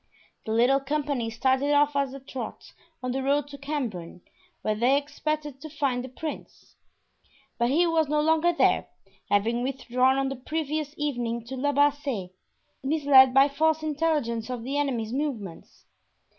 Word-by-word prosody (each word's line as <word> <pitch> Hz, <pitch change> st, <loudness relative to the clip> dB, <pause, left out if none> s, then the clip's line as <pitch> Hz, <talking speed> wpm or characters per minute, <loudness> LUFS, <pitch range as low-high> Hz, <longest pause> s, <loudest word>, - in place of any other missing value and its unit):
The -, -, -2 dB
little 245 Hz, +5 st, +4 dB
company 280 Hz, -4 st, -2 dB
started 265 Hz, +5 st, +1 dB
off 290 Hz, 0 st, +3 dB
at 280 Hz, -2 st, +1 dB
a 275 Hz, -, -8 dB
trot 265 Hz, -1 st, -8 dB, 0.3 s
on 255 Hz, -, -1 dB
the 265 Hz, +2 st, -2 dB
road 280 Hz, +2 st, +1 dB
to 285 Hz, -, -9 dB
Cambrin, 235 Hz, -, -4 dB, 0.4 s
where 215 Hz, -, +1 dB
they 245 Hz, +6 st, +3 dB
expected 295 Hz, -1 st, -3 dB
to 310 Hz, -, -8 dB
find 275 Hz, -4 st, -1 dB
the 260 Hz, -, -7 dB
prince. 305 Hz, +4 st, -8 dB, 0.8 s
But 235 Hz, 0 st, +2 dB
he 325 Hz, +6 st, +3 dB
was 325 Hz, -3 st, +1 dB
no 300 Hz, 0 st, +2 dB
longer 320 Hz, +3 st, +3 dB
there, 340 Hz, -, +2 dB, 0.4 s
having 225 Hz, +4 st, +1 dB
withdrawn 260 Hz, 0 st, +1 dB
on 270 Hz, 0 st, 0 dB
the 270 Hz, -, -4 dB
previous 305 Hz, +2 st, -3 dB
evening 240 Hz, -5 st, -2 dB
to 260 Hz, +3 st, -6 dB
La 285 Hz, +3 st, 0 dB
Bassee, 285 Hz, -9 st, 0 dB, 0.5 s
misled 275 Hz, -2 st, +6 dB
by 270 Hz, +1 st, +7 dB
false 315 Hz, +2 st, +1 dB
intelligence 295 Hz, -7 st, -1 dB
of 245 Hz, -2 st, -4 dB
the 270 Hz, +4 st, -3 dB
enemy's 245 Hz, -6 st, -1 dB
movements. 250 Hz, -, -5 dB
275 Hz, 155 wpm, -26 LUFS, 245-295 Hz, 0.8 s, by